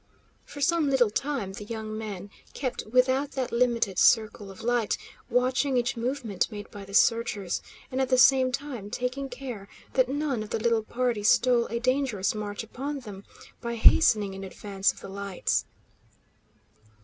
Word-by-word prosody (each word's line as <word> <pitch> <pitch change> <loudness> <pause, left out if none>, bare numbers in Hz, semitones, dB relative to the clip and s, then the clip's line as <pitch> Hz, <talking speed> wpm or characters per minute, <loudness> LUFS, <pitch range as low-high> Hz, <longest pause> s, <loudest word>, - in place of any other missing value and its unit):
For 285 - -9
some 335 -2 +2
little 250 -5 +3
time 255 -6 -2
the 205 - -7
young 215 0 -5
men 205 -3 -6 0.2
kept 255 -5 -3
without 260 +4 +2
that 260 -2 -2
limited 235 -5 +1
circle 215 -3 +3
of 195 - -11
light, 240 -2 +1 0.3
watching 255 +2 +2
each 245 +2 0
movement 235 -4 -2
made 205 -1 -8
by 200 -1 -9
the 200 0 -7
searchers, 215 -6 +2 0.3
and 260 +1 0
at 260 - 0
the 255 - +4
same 260 0 +6
time 250 -6 -5
taking 250 +4 -3
care 245 -6 -7 0.3
that 260 -1 +3
none 280 -4 -1
of 215 - -6
the - - -1
little 230 0 +2
party 240 0 -1
stole 235 +3 +4
a 235 - -3
dangerous 250 -6 0
march 210 0 -4
upon 275 +5 -5
them 205 -4 -10 0.4
by 235 -1 -3
hastening 220 -4 +5
in 195 0 -7
advance 195 +1 -1
of - - -16
the - - -8
lights. 195 -1 -2
235 Hz, 165 wpm, -27 LUFS, 205-260 Hz, 0.4 s, same